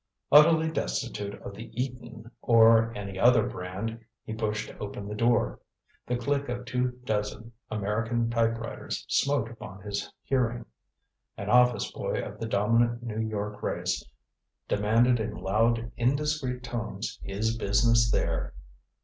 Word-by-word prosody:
Utterly 160 +2 +7
destitute 100 - -3
of - - -7
the 110 +3 -9
Eton 120 -2 -5
or 115 -1 +6
any 100 -2 -6
other 120 -1 +5
brand, 105 +6 -5 0.2
he 110 - -6
pushed 110 -1 -2
open 100 -1 -6
the 105 - -5
door. 110 - +1 0.5
The 125 - 0
click 140 +2 -1
of 125 0 -4
two 125 0 0
dozen 105 +1 -2 0.2
American 115 +3 -1
typewriters 115 0 -2
smote 140 -5 +1
upon 105 -4 -10
his 100 -1 -4
hearing. 120 -3 0 0.7
An 100 +1 -3
office 125 -3 +4
boy - - -2
of - - -6
the 115 - -3
dominant 115 +3 +2
New 110 -2 -4
York 105 -1 -3
race - - -1 0.6
demanded 115 +4 +3
in 110 0 -3
loud 115 +4 +1
indiscreet 130 0 0
tones 115 -4 -4
his 110 +4 -1
business 115 +2 +3
there. - - -1
115 Hz, 130 wpm, -28 LUFS, 105-120 Hz, 0.7 s, Utterly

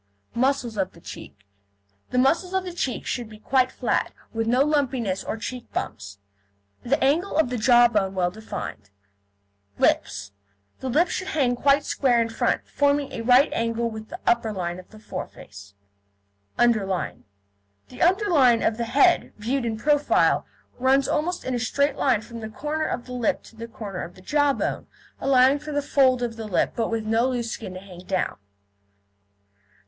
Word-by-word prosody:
MUSCLES 250 -3 0
OF 190 -1 -1
THE - - -16
CHEEK 100 -10 -11 0.6
The 250 - -2
muscles 335 +8 +2
of 380 - +1
the 360 -2 -6
cheeks 270 -7 -3
should 240 -3 -3
be 215 - -12
quite 255 +4 +1
flat, - - -1 0.2
with 225 0 -1
no 250 +3 +4
lumpiness 260 -10 0
or - - -4
cheek 245 +2 -7
bumps, 100 0 -5 0.6
the 275 +5 0
angle 315 +8 +1
of 315 -6 +3
the 250 - -1
jaw 240 +1 +6
bone 195 -4 0
well 180 -1 +1
defined. 215 - -7 0.9
LIPS 100 0 +1 0.5
The 260 - -4
lips 315 +8 +2
should 370 - -3
hang 275 -10 +1
quite 280 +3 +3
square 250 -4 +2
in 230 0 +1
front, 225 - -1
forming 285 -1 +1
a 245 - -5
right 250 +5 +5
angle 230 0 -1
with 220 0 -8
the - - -8
upper 235 -2 +2
line 180 -3 -4
of 185 - -13
foreface. 100 - -9 0.8
UNDERLINE 210 -6 +1 0.6
The - - -10
underline 340 - +4
of 220 - +1
the 235 - -2
head, 285 +9 +3
viewed 240 +4 -1
in 225 -1 -2
profile, 290 +5 +2 0.3
runs 265 +1 +3
almost 325 +4 -1
in 260 - -2
a 245 - 0
straight 280 +4 +1
line 255 -7 +2
from 230 +1 -9
the 220 -1 -6
corner 300 +7 -3
of 240 - -3
the 250 - -8
lip 245 -3 0
to - - -16
the 230 +1 -7
corner 215 -6 -6
of 170 - -8
the 185 - -15
jawbone, 290 +3 0 0.3
allowing 265 +1 +4
for 300 +1 -7
the 290 -1 -1
fold 260 -3 +3
of 230 -1 -3
the 220 -1 -5
lip, 195 - +1
but 230 -2 -1
with 225 -1 -2
no 225 +4 +2
loose 240 -3 -2
skin 190 -5 -6
to - - -6
hang 185 -2 -12
down. 185 0 -2
240 Hz, 175 wpm, -24 LUFS, 220-275 Hz, 0.9 s, jaw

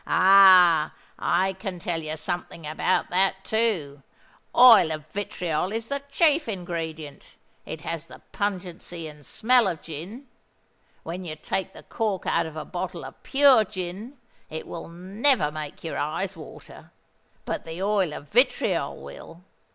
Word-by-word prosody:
"Ah! 185 -4 +6 0.2
I 190 +1 +1
can 190 -1 -6
tell 175 -2 -3
you 155 0 -5
something 170 0 -5
about 155 +4 0
that 190 +1 +2
too. 185 -12 -1 0.5
Oil 235 -9 +8
of 155 -1 -5
vitriol 180 -3 -2
is 225 +1 -4
the 280 0 -2
chief 300 -2 +2
ingredient: 165 -6 -6 0.3
it 155 - -6
has 165 +1 -5
the - - -12
pungency 180 -4 -4
and 150 -1 -12
smell 240 - +3
of 170 -4 -2
gin. 175 - -8 0.8
When 175 +3 -6
you 160 -3 -5
take 190 +4 -3
the - - -13
cork 215 -5 -3
out 170 -1 +1
of 160 - -10
a - - -5
bottle - - -5
of - - -12
pure 270 -4 +5
gin, 200 +6 -7 0.3
it 160 - -6
will 165 - -7
never 190 - +1
make 150 -1 -7
your 165 - -4
eyes 180 +6 -2
water: 155 -3 -12 0.6
but - - -3
the 165 +3 -6
oil 200 -5 +1
of 150 - -8
vitriol 245 - +1
will. 165 +2 -12
180 Hz, 150 wpm, -25 LUFS, 160-205 Hz, 0.8 s, Oil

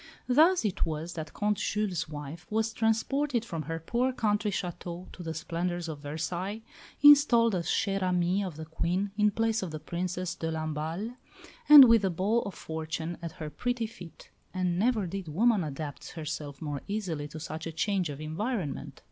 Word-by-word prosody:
Thus 315 +4 +4
it 200 - 0
was 160 +2 -3
that 155 -2 -6
Comte 210 -1 0
Jules' 195 -7 -1
wife 150 +2 -8
was 220 +1 0
transported 235 +3 +1
from 165 -7 -4
her 165 +2 -4
poor 240 +10 0
country 210 -3 0
château 180 -1 -5
to - - -10
the 160 -2 -4
splendours 175 +1 -3
of 155 -3 -5
Versailles, 175 +8 -4 0.4
installed 275 -6 +7
as 170 -3 -1
chère 195 -2 +1
amie 180 +1 +1
of 180 -5 -5
the 160 +1 -7
Queen 180 +5 -1
in 210 0 +4
place 225 +2 0
of 185 - -3
the 155 -1 -6
Princesse 180 +2 -3
de 165 0 -3
Lamballe, 160 +8 -3 0.5
and 295 -3 +13
with 230 -2 +6
the 195 - +1
ball 195 +7 +1
of 200 - -7
fortune 160 +1 -4
at 165 -2 -5
her 155 -4 -7
pretty 245 +3 -1
feet. 185 -6 -12 0.2
And 180 -1 0
never 220 -2 +2
did 185 0 -5
woman 205 +5 +3
adapt 145 -1 -6
herself 150 -3 -5
more 145 -2 -3
easily 180 -8 -3
to 155 +2 -8
such 155 +1 -5
a - - -4
change 185 +1 0
of 145 -1 -6
environment. 170 - -3
180 Hz, 180 wpm, -29 LUFS, 160-215 Hz, 0.5 s, and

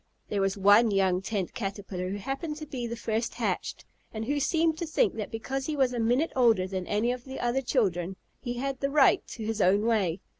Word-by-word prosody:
There 200 - 0
was 195 +1 0
one 205 +4 +6
young 190 -2 +2
Tent 195 -2 -3
Caterpillar 195 -3 -4
who 200 - -3
happened 275 - -4
to 305 0 -7
be 255 -5 -4
the 235 - -4
first 225 0 -2
hatched, - - -3 0.3
and 220 0 -4
who 290 +4 0
seemed 320 +2 +1
to 340 - -3
think 310 - +2
that 215 -2 -5
because 265 +4 -4
he 310 - -2
was 265 -3 +2
a 240 - -2
minute 245 +8 +2
older 230 -7 +4
than 185 -1 -4
any 215 +4 +1
of 250 -1 -5
the 265 0 -7
other 245 +2 0
children 190 - 0 0.2
he 245 -2 -4
had 270 +1 -3
the 275 - 0
right 280 -1 +5
to 220 - -7
his 220 -1 -1
own 200 +4 +3
way. 200 -7 +1
230 Hz, 225 wpm, -28 LUFS, 200-265 Hz, 0.3 s, one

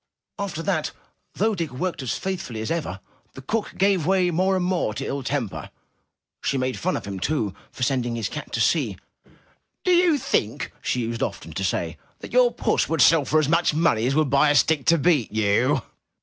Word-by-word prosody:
After 190 -5 -3
that, 165 -6 -1 0.4
though 220 +2 +1
Dick 170 -5 -2
worked 165 +6 -3
as 130 - -2
faithfully 180 -12 -4
as 110 - -3
ever, 145 - -3 0.3
the 135 - -10
cook 215 +9 -2
gave 195 -3 +3
way 185 -2 +3
more 185 +3 +2
and 185 -1 0
more 175 - 0
to - - -4
ill 140 - -3
temper. 130 -4 -3 0.7
She 140 - 0
made 130 0 -2
fun 185 +2 0
of - - -7
him, 100 -1 -5
too, 110 -3 -1 0.2
for 130 - -5
sending 120 -2 0
his 115 -2 -2
cat - - -7
to - - -1
sea. - - +1 0.9
Do 365 - +2
you 350 -3 +4
think,'' 115 - -1
she 125 - -1
used 115 +1 -3
often - - -3
to - - -3
say, - - -2 0.2
''that - - -10
your - - +5
puss - - 0
will 165 - 0
sell 160 -2 +5
for 155 +3 +3
as 155 - +1
much 165 -1 +2
money 140 -8 +2
as 135 - 0
would 155 -3 +2
buy 140 +2 +4
a 145 - +3
stick 145 -1 +2
to 170 - +6
beat 145 -6 +2
you? 105 -1 +2
155 Hz, 205 wpm, -24 LUFS, 125-185 Hz, 0.9 s, to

